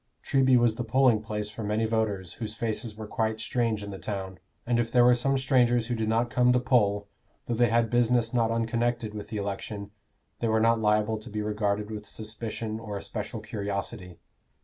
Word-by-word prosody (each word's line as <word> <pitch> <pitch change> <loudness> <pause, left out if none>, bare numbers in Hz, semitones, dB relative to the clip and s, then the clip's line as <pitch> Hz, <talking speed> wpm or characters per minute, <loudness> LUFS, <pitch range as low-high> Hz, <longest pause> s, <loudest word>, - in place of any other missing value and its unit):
Treby 130 -2 +4
was 120 -2 +4
the 125 - -2
polling 120 -1 +3
place 105 -1 -4
for 110 +2 -6
many 105 +2 0
voters 105 -5 -1
whose 110 -1 -4
faces 115 -1 -2
were 110 0 -7
quite 110 +1 -1
strange 115 -3 -1
in 100 - -6
the 95 - -7
town; 95 -4 -5 0.3
and 120 0 +1
if 115 -1 -1
there 125 0 +5
were 125 - +7
some 135 +3 +2
strangers 125 -3 +3
who 120 - -2
did 110 -1 -1
not 115 +1 +1
come 125 0 +4
to 125 - +4
poll, 105 -6 +2 0.4
though 120 - -2
they 120 0 +3
had 115 0 +2
business 120 -1 +2
not 115 -2 +2
unconnected 115 0 -1
with 105 -1 -6
the 110 - -4
election, 100 0 -4 0.5
they 115 - 0
were 110 0 +2
not 115 +1 +3
liable 105 0 +2
to 110 - -9
be 105 0 -3
regarded 105 0 -1
with 105 -1 -6
suspicion 110 +1 -5
or 105 -3 -5
especial 110 +2 -5
curiosity. 100 -3 -4
110 Hz, 200 wpm, -27 LUFS, 105-120 Hz, 0.5 s, were